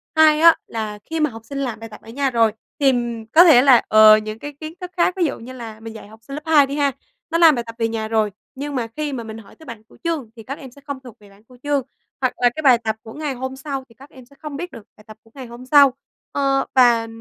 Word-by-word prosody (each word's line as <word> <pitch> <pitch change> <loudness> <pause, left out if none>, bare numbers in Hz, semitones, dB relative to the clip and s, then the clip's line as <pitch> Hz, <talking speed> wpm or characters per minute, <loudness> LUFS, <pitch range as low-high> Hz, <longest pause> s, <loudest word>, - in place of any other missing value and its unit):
hai 310 -1 +5
á, 335 0 +7
là 215 -2 -5
khi 325 0 -4
mà 305 -1 +2
học 225 -2 -11
sinh 280 +5 -7
làm 255 -5 -3
bài 225 0 -9
tập 210 - -13
ở 225 - -15
nhà 275 +3 -1
rồi, 230 -3 +2 0.3
tìm 240 -5 0
có 335 +3 +9
thể 305 -8 +7
là, 260 -3 +6
ờ, 215 0 +7
những 215 +1 -6
cái 290 0 -8
kiến 315 0 -7
thức 360 - -7
khác. 355 - +2
Ví 355 - +2
dụ 295 - -3
như 250 +3 -10
là 225 -3 -9
mình 225 0 -9
dạy 220 - -11
học 220 +1 -16
sinh 275 +5 -8
lớp 300 - -6
hai 305 -3 +5
đi 280 - -5
ha, 285 -1 +1 0.4
nó 335 - 0
làm 325 -4 +6
bài 240 - -3
tập 230 - -9
về 225 -1 0
nhà 225 -1 -4
rồi, 220 -2 0 0.2
nhưng 285 +1 -5
mà 235 -3 -2
khi 295 +5 -5
mà 240 -3 -5
mình 220 0 -8
hỏi 215 -3 -15
tới 320 - -17
bảng 230 -3 -10
cửu - - -22
chương 320 -9 -3
thì 225 - -12
các 275 +5 -7
em 265 -4 -11
sẽ 280 - -18
không 285 -2 -7
thuộc 245 -4 -13
về 205 -1 -18
bảng 200 +2 -22
cửu 250 +2 -19
chương. 290 -1 0 0.4
Hoặc 255 -1 +1
là 245 - +3
cái 310 - -4
bài 255 -4 +6
tập 220 -1 -3
của 220 - -11
ngày 300 -3 -4
hôm 260 +1 -6
sau 270 0 -5
thì 230 - -21
các 275 +4 -16
em 260 -4 -15
sẽ 280 +3 -22
không 300 -2 -7
biết 350 +3 -6
được 230 -5 -11
bài 215 - -18
tập 215 - -13
của 225 - -24
ngày 265 -2 -8
hôm 240 +2 -11
sau, 280 -1 +6 0.4
ờ, 275 -1 0
và 240 -3 +4
255 Hz, 300 wpm, -20 LUFS, 225-285 Hz, 0.4 s, có